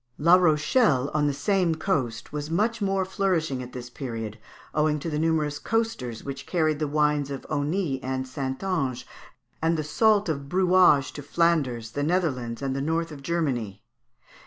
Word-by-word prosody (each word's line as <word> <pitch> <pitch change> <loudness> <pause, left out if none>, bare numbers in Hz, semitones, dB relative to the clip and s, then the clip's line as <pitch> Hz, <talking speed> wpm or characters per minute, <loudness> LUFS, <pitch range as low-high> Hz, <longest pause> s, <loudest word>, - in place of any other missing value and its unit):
La 170 +4 +4
Rochelle, 155 - +3
on 150 -1 +2
the - - +2
same 175 +3 +1
coast, 135 - -2
was 150 0 -4
much 215 +6 0
more 195 -1 +1
flourishing 180 -8 0
at 125 0 -8
this 125 -1 -7
period, 115 -4 -5 0.3
owing 150 0 +2
to 160 +3 -4
the 150 - -1
numerous 155 -2 0
coasters 225 - -2
which 140 -1 -7
carried 155 -4 +1
the 155 - 0
wines 150 -1 +1
of 140 -1 -6
Aunis 150 0 -1
and 130 0 -3
Saintonge, 135 +1 -2 0.6
and 165 +1 +2
the 155 - -1
salt 210 +6 +3
of 140 -3 -3
Brouage 180 -6 +4
to 145 - -7
Flanders, 140 -7 0
the 145 - -3
Netherlands, 140 -8 -1
and 135 -1 -1
the 135 - -2
north 165 +3 -1
of 145 -2 -9
Germany. 135 - -2
150 Hz, 165 wpm, -26 LUFS, 135-170 Hz, 0.6 s, La